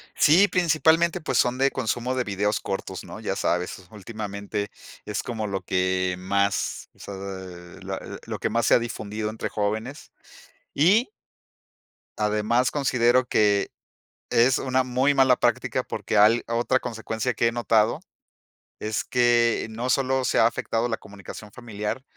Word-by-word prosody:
Sí, 180 +7 +5
principalmente, 170 0 +2
pues, 160 - -1
son 125 0 +2
de 135 +1 +3
consumo 125 0 -2
de 130 -1 -1
videos 105 0 -1
cortos, 95 -2 -5
¿no? - - -9
Ya 100 -3 -3
sabes, 90 +1 -1
últimamente, 105 -1 -5 0.3
es 105 - -3
como 110 -3 -4
lo 95 -2 -3
que 95 0 0
más 100 +2 -1
o - - -28
sea, 100 - -8
eh, 95 -3 -8
la - - -5 0.3
lo - - -5
que - - -2
más 115 +1 +1
se - - +5
ha - - +6
difundido 110 -2 -4
entre 110 - -4
jóvenes. 110 +6 -3 0.6
Y 200 - +4 1.1
además, 105 +4 +1
considero 125 -3 +2
que 105 -2 +2 0.6
es 120 +2 +4
una 130 0 +1
muy 130 +3 +2
mala 130 -2 +5
práctica, 120 -2 0
porque, 110 - -3
al 110 +3 +5
otra 120 +3 +1
consecuencia 115 0 -3
que 115 - +1
he - - +1
notado 115 -2 +2 0.8
es 110 0 -2
que 120 -2 +2
no 115 +3 -4
solo 130 0 +1
se - - +2
ha 115 - +6
afectado 115 0 -2
la 115 - -1
comunicación 100 +1 -11
familiar, 115 +1 -5
115 Hz, 150 wpm, -25 LUFS, 105-125 Hz, 1.1 s, ha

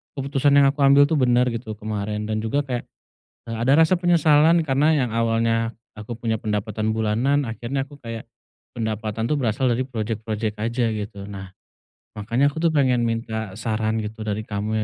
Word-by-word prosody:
keputusan 140 +1 +1
yang 140 - +6
aku 145 - -17
ambil 140 +1 +7
tuh 160 - 0
bener 125 -1 +3
gitu 115 -1 -5
kemarin, 105 0 -3
dan 110 - 0
juga 140 +6 0
kayak, 125 -2 -2 0.7
eee, 115 - -3
ada 120 +4 +2
rasa 165 +3 +4
penyesalan 165 -2 +4
karena 140 +2 +2 0.2
yang - - -6
awalnya 115 0 +1 0.2
aku 110 +2 -7
punya 115 -1 0
pendapatan 110 +1 -2
bulanan 120 +7 +1
akhirnya 125 +4 -3
aku 145 - -13
kayak 115 -2 -7 0.5
pendapatan 110 0 -3
tuh 150 - +1
berasal 130 0 0
dari 120 +2 +1
project-project 110 -2 -3
aja 115 +2 -1
gitu 105 -2 -5
nah, 95 -2 -8 0.6
makanya 115 +7 0
aku 160 +3 -5
tuh 165 - +4
pengen 130 -5 +2
minta 110 -3 -3
saran 110 0 -1
gitu 110 +1 -5
dari 110 0 -3
kamu 105 +1 -3
115 Hz, 170 wpm, -23 LUFS, 110-135 Hz, 0.7 s, ambil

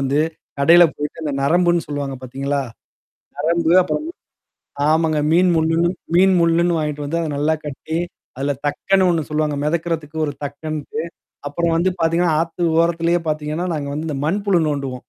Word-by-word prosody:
வந்து 135 +2 +1 0.4
கடையில 170 +4 +7
போயிட்டு 150 +2 -5
அந்த 150 -2 -2
நரம்புன்னு 175 +3 +2
சொல்லுவாங்க 145 -2 -4
பார்த்தீங்களா? 135 +2 -2 0.8
நரம்பு 165 +2 +1
அப்புறம். 305 - -3 0.8
ஆமாங்க. 160 -1 +2
மீன் 180 +2 +4
முள்ளுன்னு 165 +1 +2 0.3
மீன் 190 +2 +5
முள்ளுன்னு 170 +1 +3
வாங்கிட்டு 150 -1 -3
வந்து 160 +4 -2
அத 165 - -2
நல்லா 150 +2 +1
கட்டி, 150 +2 -5 0.4
அதில 140 +2 -1
தக்கன்னு 185 +6 +2
ஒண்ணு 165 -4 0
சொல்லுவாங்க. 150 -1 0
மிதக்கறதுக்கு 160 -1 -2
ஒரு 145 - -3
தக்கன்ட்டு. 150 +1 -5 0.5
அப்புறம் 165 +3 0
வந்து 180 +3 +2
பார்த்தீங்கன்னா, 165 0 +2
ஆத்து 165 +1 -3 0.2
ஓரத்திலேயே 170 +1 +1
பார்த்தீங்கன்னா, 155 +3 -2
நாங்க 140 -2 -3
வந்து 155 +2 -4
இந்த 145 -3 -3
மண்புழு 200 +1 +1
நோண்டுவோம். 140 -3 -2
160 Hz, 145 wpm, -20 LUFS, 145-170 Hz, 0.8 s, கடையில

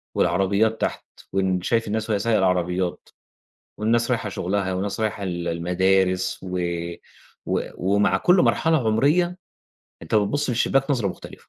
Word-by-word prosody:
والعربيات 100 +5 +1
تحت - - -2 0.3
وأنت 95 -2 0
شايف 115 +2 0
الناس 110 +1 -2
وهي 105 -2 +1
سايقة 115 +2 +2
العربيات 90 -1 0 0.7
والناس 115 +3 +1
رايحة 115 -4 0
شُغلها 95 0 -2
وناس 100 +3 -3
رايحة 110 -2 -2
ال 85 -2 -3
المدارس 90 +2 +1
و 90 -1 -4 0.9
و - - 0
ومع 100 +3 +2
كل 180 +1 +4
مرحلة 160 -7 +2
عمرية، 155 +11 +2 0.6
أنت 80 - -4
بتبُصّ 110 +8 +1
من - - -1
الشباك 135 +4 +1
نظرة 120 -8 +1
مختلفة. - - -10
100 Hz, 140 wpm, -23 LUFS, 95-115 Hz, 0.9 s, كل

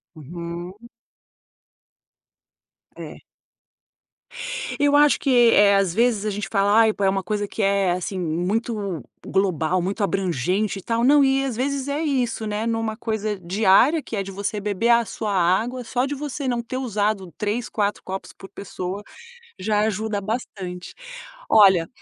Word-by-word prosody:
Uhum. 170 +4 -7 2.2
É. - - -10 1.6
Eu 290 0 +3
acho 295 0 +5
que, 275 - -2 0.2
eh, 200 -1 +6
às 195 -3 +1
vezes 230 -2 +1
a 215 - 0
gente 205 -1 -4
fala: 200 -1 +2
"Ai, 220 -1 +4
pô, 205 - -4
é 195 - +4
uma 195 -1 -1
coisa 205 +2 -2
que 220 - -5
é 195 -2 +2
assim, 185 +1 -3
muito 185 - -2 0.2
global, 185 -2 0
muito 195 +4 -2
abrangente 195 +2 -1
e - - -11
tal.", 230 +4 -1
não, 285 +2 +6
e 270 0 +2
às 250 -4 -3
vezes 275 +2 -2
é 285 +2 -2
isso, 250 -7 -1
né, 210 +1 -2
em 230 - 0
uma 225 -1 -2
coisa 215 -2 -2
diária 200 - +3
que 230 - -7
é 200 - -1
de 195 - -8
você 200 +2 -3
beber 205 +3 -1
a 235 -1 +5
sua 205 0 -4
água 205 +8 +1
só 250 +3 -1
de 290 - -3
você 285 -1 -5
não 240 -1 0
ter 245 +2 -6
usado 210 -7 -1
três, 215 +3 -2
quatro, 205 -1 -1
copos 190 0 -6
por 195 - -13
pessoa, 195 0 -6 0.6
já 210 +2 0
ajuda 215 -1 -1
bastante. 190 -5 -5 0.6
Olha, 190 -6 +6
205 Hz, 160 wpm, -23 LUFS, 190-235 Hz, 2.2 s, eh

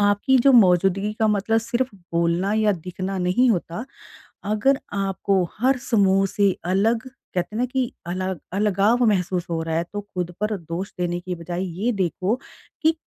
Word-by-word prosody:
आपकी 205 +6 +3
जो 270 +3 +5
मौजूदगी 195 -1 +4
का 220 - +3
मतलब 210 +2 +2
सिर्फ 235 +3 -1 0.2
बोलना 170 +4 +1
या 215 -1 +3
दिखना 185 +2 -5
नहीं 185 +8 +3
होता। 190 +2 -2 0.6
अगर 215 +7 +2
आपको 195 -1 0
हर 255 +3 +2
समूह 195 -3 +3
से 200 -2 +3
अलग 220 +7 +1 0.3
कहते 180 +4 -2
हैं - - -2
ना 250 - +2
कि 255 -1 -2
अलग 185 0 -3
अलगाव 210 +4 +2
महसूस 180 -3 +1
हो 165 -1 -1
रहा 160 0 -2
है 165 - +1
तो 205 - -3
खुद 180 -3 -5
पर 210 +1 0
दोष 170 +3 -5
देने 175 0 -1
की 180 0 -5
बजाए, 175 +2 -5
ये 190 +6 -1
देखो 195 +1 0 0.5
कि 320 - +5
195 Hz, 170 wpm, -23 LUFS, 180-220 Hz, 0.6 s, जो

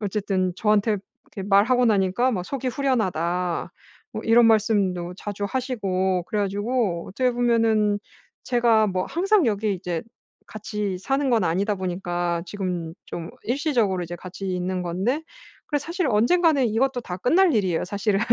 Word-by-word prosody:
어쨌든 195 -3 -1
저한테 210 0 +2 0.4
이렇게 195 0 -5
말하고 240 +5 +4
나니까 205 +4 +2
막 180 -6 -2
"속이 265 +1 -3
후련하다." 180 - -1 0.4
뭐 - - -5
이런 230 +1 +5
말씀도 200 -5 +2
자주 205 0 -4
하시고 190 -9 -1
그래 210 - -3
가지고 205 -2 -1
어떻게 250 +6 +1
보면은 225 -4 +2 0.5
제가 230 -3 +3
뭐 185 -1 -1
항상 385 - +2
여기 210 -1 0
이제 180 -3 -3 0.4
같이 210 -3 -4
사는 270 +5 0
건 230 -2 +3
아니다 200 +5 0
보니까 175 -2 -2
지금 180 -4 -4
좀 165 -1 -6
일시적으로 240 - 0
이제 175 +1 -6
같이 185 +2 -8
있는 180 0 -2
건데 195 - -1 0.4
그래서 290 -1 -2
사실 340 -2 -1
언젠가는 275 +5 +3
이것도 245 +4 0
다 180 -3 -5
끝날 335 - +3
일이에요, 185 -6 +1
사실은. 200 +1 0
205 Hz, 335 characters per minute, -24 LUFS, 185-245 Hz, 0.5 s, 이런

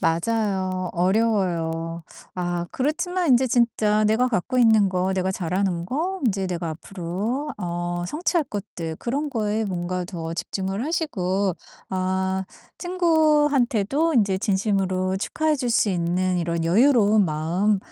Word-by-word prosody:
맞아요. 185 0 0
어려워요. 175 -4 0 0.3
아 175 -1 -2
그렇지만 350 +5 -1
인제 255 +1 +5
진짜 225 -3 +2
내가 220 +4 +3
갖고 245 +3 -1
있는 220 -4 +5
거, 185 +1 0
내가 190 0 0
잘하는 180 -1 -1
거, 345 - -2
인제 195 -3 0
내가 175 -1 -3
앞으로 195 - -4
어 175 0 -3
성취할 335 - 0
것들, 170 - -6
그런 285 - -2
거에 220 -3 -1
뭔가 180 -2 -3
더 165 -2 -5
집중을 195 +5 -3
하시고 200 - -1 0.3
아 190 0 -1 1.4
친구한테도 325 +4 +1
인제 205 -6 +3
진심으로 190 -2 0
축하해 310 +9 0
줄 260 -3 -3
수 225 -2 +3
있는 180 +1 0
이런 170 -1 -1
여유로운 215 +2 +4
마음 175 +6 0
190 Hz, 275 characters per minute, -23 LUFS, 175-230 Hz, 1.4 s, 인제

